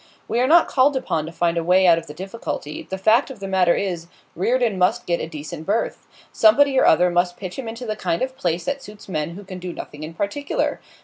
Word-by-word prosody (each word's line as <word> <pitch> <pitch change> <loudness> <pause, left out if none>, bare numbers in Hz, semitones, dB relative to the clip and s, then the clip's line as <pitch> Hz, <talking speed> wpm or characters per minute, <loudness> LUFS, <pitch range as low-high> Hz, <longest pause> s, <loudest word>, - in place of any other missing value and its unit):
'We 235 - 0
are 255 - +3
not 335 +3 +6
called 275 +2 +3
upon 160 -11 -2
to - - -7
find 170 0 0
a - - -3
way 185 +2 +4
out 170 -2 +6
of 165 - -13
the 150 - -9
difficulty. 190 -5 -6
The 190 - -3
fact 220 +8 +3
of 265 - -9
the 195 - -5
matter 185 -2 +3
is, 175 -4 -3 0.3
Reardon 230 +1 +1
must 180 - +2
get 170 -1 0
a - - -4
decent 155 0 -8
berth. 210 +3 -1 0.3
Somebody 265 +5 +5
or - - +4
other 180 +2 +5
must 175 0 +1
pitch 185 -2 -6
him 250 - -5
into 230 +2 -6
the 215 -2 -2
kind 180 -2 -1
of 260 0 -3
place 175 -10 -2
that 280 0 -2
suits 210 -3 -12
men 165 -2 -3
who 205 - -9
can 185 -1 -8
do 180 0 -5
nothing 150 -3 -9
in 160 +2 -7
particular. 280 - -2
190 Hz, 245 wpm, -22 LUFS, 170-230 Hz, 0.3 s, not